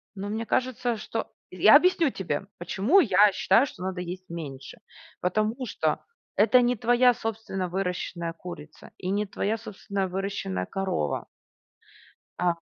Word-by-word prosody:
Ну, 195 +1 -5
мне 220 +2 -3
кажется, 245 -1 0
что - - -4 0.2
я - - +6
объясню 350 -4 +5
тебе, 190 -3 -3
почему 200 - +3
я 205 - +5
считаю, 195 +6 +4
что 185 -9 -9
надо 185 -1 -3
есть 185 +1 -7
меньше. 140 -5 -8 0.4
Потому 215 +7 0
что - - -1 0.3
это 240 +4 +5
не 245 0 +2
твоя 245 +2 +4
собственно 220 -5 -4
выращенная 180 -2 -3
курица 165 -3 -10
и 185 - -4
не 205 +2 0
твоя 205 +2 -2
собственная 200 -3 -4
выращенная 185 - -3
корова. 190 - -2 1.1
А, 180 -1 +3
195 Hz, 135 wpm, -26 LUFS, 180-225 Hz, 1.1 s, я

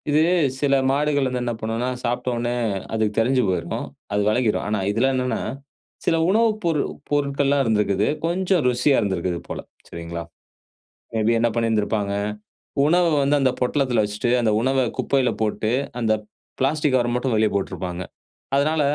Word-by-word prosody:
இது 150 +1 +4 0.4
சில 140 -1 +2 0.2
மாடுகள் 145 0 +1
வந்து 125 -1 -2
என்ன 120 -1 -1
பண்ணுன்னா 115 +3 -2 0.2
சாப்டோன்னே 120 0 -1 0.4
அதுக்கு 110 -1 0
தெரிஞ்சு 125 +3 +3
போயிருக்கும். 95 -1 -2 0.3
அது 105 - +2
வெலகிரும். 110 -1 +1
ஆனா 105 0 0
இதில 115 +6 +2
என்னான்னா, 125 -1 -1 0.7
சில - - +3
உணவு 225 +3 +4
பொருள் 165 -4 +1 0.2
பொருட்கள்லாம் 140 -1 +1
இருந்திருக்குது. 105 -3 +1 0.2
கொஞ்சம் 180 0 +1
ருசியா 125 +3 +3
இருந்திருக்குது 90 -4 -1
போல. - - -5 0.3
சரிங்களா. 85 0 -6 0.9
மே 110 - +1
பி 115 - +4
என்ன 120 - +3
பண்ணியிருந்திருப்பாங்க. 110 -3 0 0.7
உணவ 175 +4 +4 0.2
வந்து 145 +1 +3
அந்த 130 -1 +3
பொட்டலத்தில 125 -3 +1
வச்சிட்டு, 105 +4 -2
அந்த 110 -2 +2
உணவை 130 +1 +2 0.2
குப்பையில 135 -3 +2
போட்டு 110 0 0 0.3
அந்த 110 -1 +2 0.5
பிளாஸ்டிக் 145 +1 +1
கவர 120 -1 +1
மட்டும் 125 -1 0
வெளிய 110 0 +3
போட்டிருப்பாங்க. 90 -2 -3 0.5
அதனால 155 +3 +2
125 Hz, 145 wpm, -22 LUFS, 110-140 Hz, 0.9 s, இது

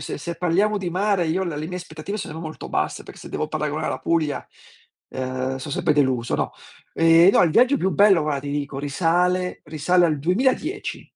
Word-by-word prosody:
se - - -5
se 170 +3 -5
parliamo 200 +5 +1
di 180 -3 -3
mare 190 -1 +1
io 180 +4 0
le 170 -5 -3
le 155 - -4
mie 180 +2 -5
aspettative 175 +4 -7
sono 160 - -6
molto 160 -1 -7
basse - - -2
per - - -13
se - - -11
devo - - -3
paragonare - - -2
la - - -3
Puglia, 160 -3 -1 0.6
uhm, 130 0 -3
so' 135 +2 -7
sempre 150 - +1
deluso, 130 -5 +1
no. - - -2 0.4
Ehm, 165 +2 +6
no, - - +4
il 170 - +3
viaggio 255 - +4
più 190 -4 0
bello 200 -5 +5
guarda 150 -2 -1
ti 140 +1 -7
dico, 140 -1 -3
risale 180 +5 0
risale 175 +4 +2
al 150 -3 -1
2010. 260 - -1
165 Hz, 200 wpm, -23 LUFS, 145-185 Hz, 0.6 s, Ehm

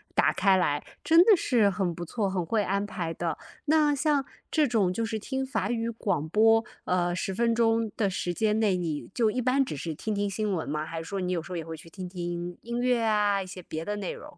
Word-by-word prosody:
打 - - +4
开 195 -2 +4
来。 150 -5 +1 0.2
真 330 +1 +7
的 420 +2 +7
是 235 -10 +3
很 190 -2 -1
不 175 - -5
错， 200 +3 -1
很 190 -2 -1
会 220 +5 +1
安 200 +1 0
排 170 -5 -4
的。 165 0 -2 0.3
那 305 -1 +4
像 285 -1 +1 0.3
这 305 -2 +3
种 215 -7 +2
就 225 +5 -1
是 220 0 -3
听 265 +4 -3
法 265 -1 -2
语 230 -1 -1
广 200 -9 -1
播， 225 +4 +5 0.2
呃， 175 -1 +1
10 190 +2 -2
分 230 +3 +2
钟 225 -1 +2
的 205 -3 +2
时 180 -1 -2
间 215 +3 +1
内， 210 -4 +3
你 160 -4 -3
就 230 -3 +2
一 250 - -1
般 260 +3 +3
只 205 - -5
是 160 +3 -4
听 215 +8 -3
听 205 0 0
新 210 +1 -2
闻 170 -4 -2
吗？ 150 +2 -2
还 165 - -6
是 - - -8
说 195 +4 -4
你 180 0 -1
有 175 -2 0
时 180 - -12
候 180 - -3
也 165 - -3
会 165 0 -6
去 165 - -14
听 185 +2 -7
听 175 -1 -4
音 235 +1 -4
乐 250 -1 +2
啊， 210 -2 +2
一 - - -11
些 185 0 -8
别 160 -2 -5
的 210 0 -2
内 195 -3 -3
容？ 300 0 -12
205 Hz, 265 characters per minute, -28 LUFS, 175-230 Hz, 0.3 s, 真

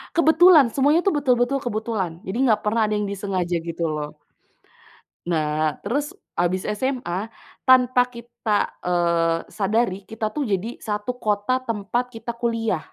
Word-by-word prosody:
Kebetulan, 320 -5 +6
semuanya 290 +6 +3
tuh 395 - +2
betul-betul 255 -1 +2
kebetulan, 220 -6 -2
jadi 190 +4 -4
enggak 215 -3 +3
pernah 215 +1 +1
ada 210 - -1
yang 210 -1 -1
disengaja 190 -3 -2
gitu 170 0 -5
loh. 150 0 -5 1.1
Nah 155 -2 0
terus 285 +8 -2 0.2
habis 175 +2 +1 0.2
SMA, 225 -5 -2 0.3
tanpa 255 -1 +5
kita 235 0 -11 0.2
kita, 210 -1 +3 0.2
eee, 170 -2 +1
sadari, 205 -1 0
kita 220 -1 -3
tuh 290 0 -2
jadi 210 +4 -2
satu 215 +3 -4
kota 210 +4 0
tempat 230 +3 -1
kita 230 -1 -6
kuliah. 230 -5 -1
215 Hz, 140 wpm, -23 LUFS, 185-245 Hz, 1.1 s, Kebetulan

